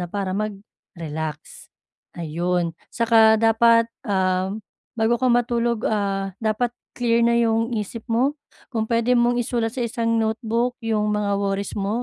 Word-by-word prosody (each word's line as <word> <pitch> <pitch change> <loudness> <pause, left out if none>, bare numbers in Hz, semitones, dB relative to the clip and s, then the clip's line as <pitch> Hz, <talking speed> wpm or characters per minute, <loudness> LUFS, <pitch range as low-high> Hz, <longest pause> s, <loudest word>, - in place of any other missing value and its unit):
na 175 - -4
para 195 0 -3
mag-relax. 170 -7 -6 0.5
Ayun, 170 +1 -1 0.2
'tsaka 225 -1 +4
dapat, 230 +1 +4 0.2
ah, 185 -1 +1 0.5
bago 230 +2 +1
ka 255 - +2
matulog, 235 -1 +1
ah, 195 -2 -1
dapat 225 +2 0 0.2
clear 235 -1 +2
na 235 0 +3
yung 230 0 +1
isip 215 +2 -4
mo. 250 +5 +2 0.4
Kung 220 -1 -1
puwede 235 +1 +2
mong 240 0 +3
isulat 235 0 -1
sa 245 - -1
isang 230 0 -1
notebook 230 +2 0
yung 210 -2 0
mga 205 -1 0
worries 200 0 -2
mo 205 +5 -1
225 Hz, 140 wpm, -22 LUFS, 200-235 Hz, 0.5 s, tsaka